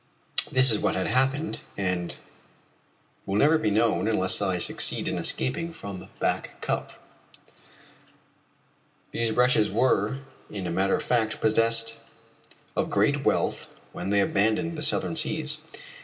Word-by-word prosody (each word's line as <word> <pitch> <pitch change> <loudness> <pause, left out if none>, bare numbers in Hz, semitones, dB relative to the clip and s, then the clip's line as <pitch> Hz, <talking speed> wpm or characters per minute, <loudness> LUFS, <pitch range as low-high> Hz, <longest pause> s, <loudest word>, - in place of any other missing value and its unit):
This 130 -1 +5
is 105 - +1
what - - -1
had 95 - -2
happened 135 +5 -1 0.2
and 90 -3 -3 1.1
what 95 - -5
will - - +1
never 155 +5 +3
be 110 - 0
known 110 +1 0
unless 95 -3 +4
I 95 -3 0
succeed 85 - +3
in - - -3
escaping 165 +6 0
from 100 - -10
Back - - -3
Cup: - - -4 2.2
These 115 -1 -1
wretches 125 -3 +2
were, 110 +1 0 0.3
as 100 -3 -6
a 85 - -3
matter 95 +3 +1
of - - -5
fact, 115 -3 -1
possessed 115 +1 +3 0.8
of - - -1
great - - 0
wealth - - -1 0.2
when 90 +2 -6
they 100 0 +2
abandoned 110 +12 0
the 155 - -6
Southern 165 - +2
Seas. 155 -2 +1
110 Hz, 140 wpm, -25 LUFS, 100-130 Hz, 2.2 s, This